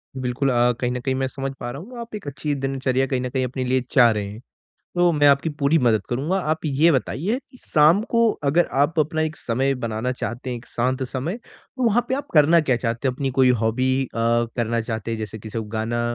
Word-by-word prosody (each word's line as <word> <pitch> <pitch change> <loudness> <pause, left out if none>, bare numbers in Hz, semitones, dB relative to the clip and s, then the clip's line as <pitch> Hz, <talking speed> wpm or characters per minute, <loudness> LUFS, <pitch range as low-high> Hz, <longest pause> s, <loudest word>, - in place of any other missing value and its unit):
बिल्कुल 130 +1 -1
अ, 120 0 +3
कहीं 125 -1 0
न 125 - -2
कहीं 130 +1 -1
मैं 135 0 0
समझ 135 0 -4
पा - - -4
रहा 140 +5 -7
हूँ 240 +5 -10
आप 230 -2 -7
एक 200 -8 -8
अच्छी 145 +1 -3
दिनचर्या 135 -1 0
कहीं 130 -2 -1
न 125 - -3
कहीं 130 0 -1
अपने 130 +1 -4
लिए 130 0 +1
चाह 120 -4 +6
रहे 105 -2 -2
हैं, 105 +3 -9 0.6
तो 175 0 +4
मैं 145 -2 +4
आपकी 140 +3 +3
पूरी 145 +4 +3
मदद 115 -6 +3
करूँगा। 150 +10 0
आप 160 0 -2
ये 150 +4 +3
बताइए, 160 - -1
कि 255 - -20
शाम 155 +4 +4
को 230 -1 +4
अगर 160 +5 +3 0.2
आप 155 +2 +1
अपना 155 +1 +1
एक 155 0 -2
समय 135 +4 0
बनाना 115 0 -2
चाहते 125 0 -5
हैं, 120 - -3
एक 115 - -13
शांत 130 +2 -1
समय, 135 - -3
तो 255 +1 -10
वहाँ 230 +1 +3
पे 260 - +1
आप 285 - -5
करना 160 +2 +6
क्या 130 -4 +1
चाहते 115 +2 -2
हो? 130 - 0
अपनी 135 +1 -2
कोई 130 -1 +6
हॉबी 115 +4 +1
अ, 130 - -6
करना 115 0 0
चाहते 110 0 -4
हैं? 115 - -2
जैसे 110 0 -6
किसी 110 +2 -7
को 110 - -2
गाना 120 +2 -1
130 Hz, 240 wpm, -22 LUFS, 120-155 Hz, 0.6 s, चाह